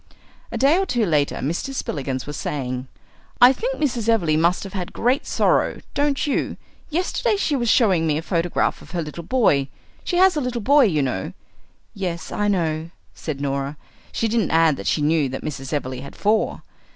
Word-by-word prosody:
A - - -3
day 285 +7 +4
or 390 - +1
two 240 -3 +1
later 150 -5 +1
Mr. 170 - -3
Spillikins 135 - -3
was 145 - -6
saying, 130 -3 -3 0.5
"I 245 +2 +8
think - - -2
Mrs. 240 -6 -1
Everleigh 175 -9 +3
must 170 +3 +2
have 195 - -8
had 180 -3 -4
great 250 +4 +1
sorrow, - - +2
don't 285 0 +1
you? 290 - -1 0.3
Yesterday 365 +7 0
she 320 -7 0
was 240 -3 0
showing 185 -10 +4
me 150 -1 +1
a 160 - -4
photograph 170 -1 0
of - - -14
her 175 - -1
little 155 +3 -7
boy 165 - +2 0.4
she 355 - -1
has 375 -1 +5
a 300 - 0
little 250 -2 -2
boy 280 +5 +5
you 155 -9 +1
know 110 -8 -3 0.3
" - - -39
"Yes, 180 -4 -4
I 210 - 0
know," 165 -5 0 0.2
said 150 -4 -5
Norah. 140 +1 -2 0.3
She 225 - 0
didn't 225 0 +1
add 160 -2 +4
that - - -6
she 150 - +1
knew 150 -2 +2
that 130 - -6
Mrs. 135 -3 -5
Everleigh 130 -3 -3
had 140 - -10
four. 215 +1 0
175 Hz, 195 wpm, -22 LUFS, 150-250 Hz, 0.5 s, I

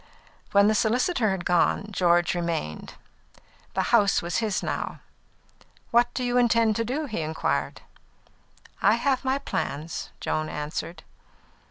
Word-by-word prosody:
When 200 0 +5
the 215 - +4
solicitor 235 - +1
had 190 -2 -3
gone, 180 +3 +2
George 175 -3 +2
remained. 170 - -3 0.8
The - - +1
house 205 -4 +5
was 170 +1 -2
his 220 -4 -1
house - - -1
now. - - -3 0.9
"What 240 +1 +4
do 255 - -1
you 245 0 +2
intend 230 -2 +3
to 230 - +1
do?" 275 +7 -2
he 220 - -4
inquired. 160 +1 -2 1.0
"I - - +5
have 275 -2 0
my 265 +1 +1
plans," 160 - -4
Joan 155 0 -2
answered. 160 +2 -5
210 Hz, 140 wpm, -26 LUFS, 170-240 Hz, 1.0 s, When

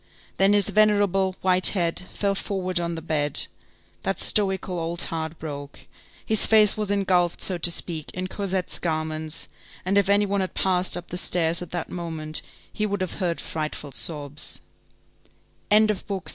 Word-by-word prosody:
Then 195 +1 +3
his 205 -2 +3
venerable, 205 -3 +2
white 185 0 +6
head 170 -2 -1
fell 200 -1 -1
forward 185 -2 -2
on 170 -1 -3
the 160 - -7
bed, 150 -3 0 0.6
that 195 - -3
stoical 190 -3 +3
old 170 +1 -3
heart 160 0 -4
broke, 145 -3 -8 0.4
his 220 -1 +4
face 215 -2 +5
was 210 -2 -3
engulfed, 185 -4 +1
so 185 -2 +3
to 170 - +6
speak, 165 -2 0
in 185 0 -3
Cosette's 190 -2 -1
garments, 155 -1 -2 0.4
and 195 +2 +3
if 200 -1 -1
any 205 +1 +4
one 200 0 -1
had 185 - -4
passed 180 -1 0
up 175 - -9
the 180 - -4
stairs 170 -2 +1
at 175 - -7
that 175 -2 -5
moment, 160 -3 -1 0.3
he 215 - -2
would 200 -1 -3
have 185 +1 -4
heard 175 -3 -1
frightful 155 -2 -5
sobs. 145 +1 0
180 Hz, 160 wpm, -23 LUFS, 160-195 Hz, 0.6 s, white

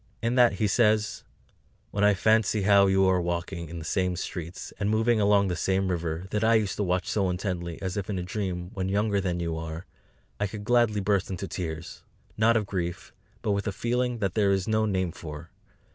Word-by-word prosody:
In 115 +1 0
that 125 -2 +5
he 110 - 0
says: 105 0 +2 0.7
"When 100 - 0
I 105 0 +5
fancy 110 +1 +2
how 100 0 +6
you 95 0 +4
are 95 -1 +3
walking 85 -1 -3
in 85 - -7
the 80 - -7
same 90 +1 0
streets, 85 -1 -6
and 100 0 0
moving 110 +1 +2
along 100 -1 +4
the 90 - -1
same 95 +3 0
river, 85 -1 -2
that 105 +1 0
I 115 +1 +5
used 105 -3 +1
to 105 - 0
watch 90 -1 0
so 100 -3 +1
intently, 90 -2 -3
as 95 +1 -3
if 100 -1 -3
in 100 - -2
a 90 - -2
dream, 90 -2 -4
when 95 -1 -2
younger 100 0 +1
than 90 -2 -2
you 85 -1 -2
are 80 +2 -6 0.5
I 105 - +1
could 105 +1 -7
gladly 120 -2 +2
burst 100 -1 +1
into 95 +1 -4
tears, 85 -2 -5 0.3
not 110 +1 +4
of 105 - -1
grief, 90 -3 -4 0.3
but 105 - +1
with 100 +2 -1
a - - 0
feeling 120 +3 -1
that 95 -5 -1
there 105 -3 +2
is 95 -2 0
no 110 0 +2
name 95 -3 0
for. 75 -2 -9
95 Hz, 215 wpm, -27 LUFS, 90-105 Hz, 0.7 s, how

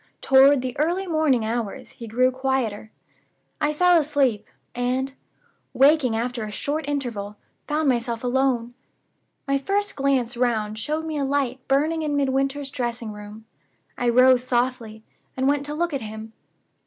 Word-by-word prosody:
Toward 270 0 +5
the 255 -1 -4
early 350 +5 0
morning 310 -9 +1
hours 225 -2 -4
he 230 - -10
grew 250 +4 +2
quieter. 255 -5 -2 0.7
I 295 0 +2
fell 355 +2 +4
asleep; 275 -8 0 0.3
and, 255 +2 -1 0.6
waking 275 -4 +4
after 240 0 -2
a 215 - -5
short 285 +8 -3
interval, 225 -8 -4 0.3
found 305 0 0
myself 235 -2 0
alone. 250 -2 0 0.7
My 275 0 +1
first 400 +7 -1
glance 270 -3 0
round 220 -3 -1
showed 305 +7 -2
me 315 -1 -3
a - - 0
light 270 -2 -1
burning 305 +4 +1
in 300 -2 -1
Midwinter's 275 0 -1
dressing 235 -3 -3
room. 210 +1 -10 0.5
I 245 - 0
rose 255 +1 +5
softly, 240 -3 -2 0.3
and 260 +1 +1
went 285 0 +1
to 295 - -4
look 340 0 -1
at 275 - -2
him. 220 0 -8
260 Hz, 150 wpm, -23 LUFS, 235-285 Hz, 0.7 s, Toward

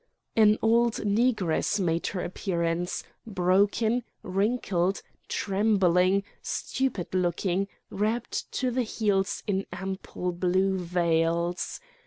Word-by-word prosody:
An 215 -1 +6
old 230 +1 +4
Negress 210 -3 +1
made 170 -3 0
her 185 -3 -3
appearance, 175 -1 -2 0.2
broken, 205 +5 +2 0.2
wrinkled, 195 -2 0 0.2
trembling, 195 -2 +2 0.2
stupid 255 -11 -2
looking, 185 +1 0 0.2
wrapped 220 +4 -2
to 255 -2 0
the 255 +1 +1
heels 205 -4 0
in 195 -2 -1
ample 190 -1 -4
blue 185 +2 +1
veils. 170 0 0
195 Hz, 95 wpm, -27 LUFS, 180-215 Hz, 0.2 s, An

